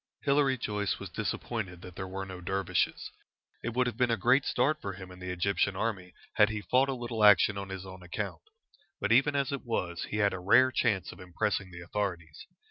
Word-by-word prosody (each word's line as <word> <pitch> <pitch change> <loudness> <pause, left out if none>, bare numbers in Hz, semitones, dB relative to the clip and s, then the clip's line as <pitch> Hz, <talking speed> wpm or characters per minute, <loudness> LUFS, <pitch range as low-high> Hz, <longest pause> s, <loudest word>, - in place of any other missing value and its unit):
Hilary 140 -1 +3
Joyce 105 -3 -2
was - - -8
disappointed 95 -7 -4
that 90 -2 -10
there 95 - -5
were 95 +1 -5
no 95 -1 -8
dervishes. 95 +1 -1 0.5
It 120 0 -3
would 125 0 +3
have 120 -3 -3
been 125 -1 +2
a 115 - +2
great 125 +6 +3
start 145 +5 +1
for 100 - -4
him 95 -1 -10
in 90 - -12
the 90 0 -6
Egyptian 95 +2 0
army 95 -4 -3 0.2
had 105 -1 +6
he 110 -1 -3
fought 130 +4 +3
a 135 - -1
little 120 -3 -3
action 105 0 +7
on 100 -1 -5
his 95 0 -6
own 95 -1 -10
account. 90 0 -5 0.6
But 105 - -1
even 135 +5 +4
as 140 -1 0
it 140 - -4
was, 90 -8 -2
he 105 - -4
had 100 -2 +2
a 95 - -4
rare 120 +8 +5
chance 105 -8 0
of - - -13
impressing 95 +2 -2
the 85 -1 -10
authorities. 85 -4 -4
100 Hz, 215 wpm, -30 LUFS, 95-120 Hz, 0.6 s, action